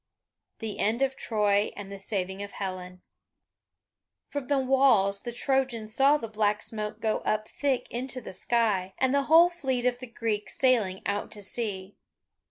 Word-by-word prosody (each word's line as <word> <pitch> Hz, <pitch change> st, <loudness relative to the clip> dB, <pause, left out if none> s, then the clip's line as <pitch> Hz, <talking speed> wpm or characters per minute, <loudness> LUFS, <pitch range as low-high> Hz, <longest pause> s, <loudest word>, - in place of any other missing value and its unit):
THE 220 Hz, -2 st, -6 dB
END 230 Hz, +5 st, +1 dB
OF 270 Hz, 0 st, 0 dB
TROY 210 Hz, -3 st, +1 dB
AND 200 Hz, -1 st, -8 dB
THE 200 Hz, -, -7 dB
SAVING 190 Hz, -1 st, -3 dB
OF 200 Hz, 0 st, -7 dB
HELEN 185 Hz, -2 st, -6 dB, 1.3 s
From 285 Hz, -3 st, -4 dB
the 285 Hz, -, +2 dB
walls 255 Hz, -7 st, +3 dB
the 240 Hz, -, -5 dB
Trojans 240 Hz, -4 st, -1 dB
saw 275 Hz, +4 st, +5 dB
the 230 Hz, -, -6 dB
black 210 Hz, -1 st, 0 dB
smoke 215 Hz, -1 st, -4 dB
go 220 Hz, -1 st, 0 dB
up 215 Hz, 0 st, -1 dB
thick 275 Hz, -3 st, -1 dB
into 255 Hz, +2 st, -4 dB
the 220 Hz, -, -8 dB
sky, 195 Hz, -2 st, 0 dB
and 260 Hz, 0 st, +2 dB
the 280 Hz, -1 st, +2 dB
whole 335 Hz, +4 st, +7 dB
fleet 265 Hz, -8 st, -2 dB
of 245 Hz, -1 st, +1 dB
the 255 Hz, -, -8 dB
Greeks 215 Hz, -4 st, -3 dB
sailing 225 Hz, -8 st, +2 dB
out 205 Hz, 0 st, -2 dB
to 205 Hz, -2 st, -8 dB
sea. 200 Hz, -3 st, -4 dB
220 Hz, 170 wpm, -28 LUFS, 200-260 Hz, 1.3 s, whole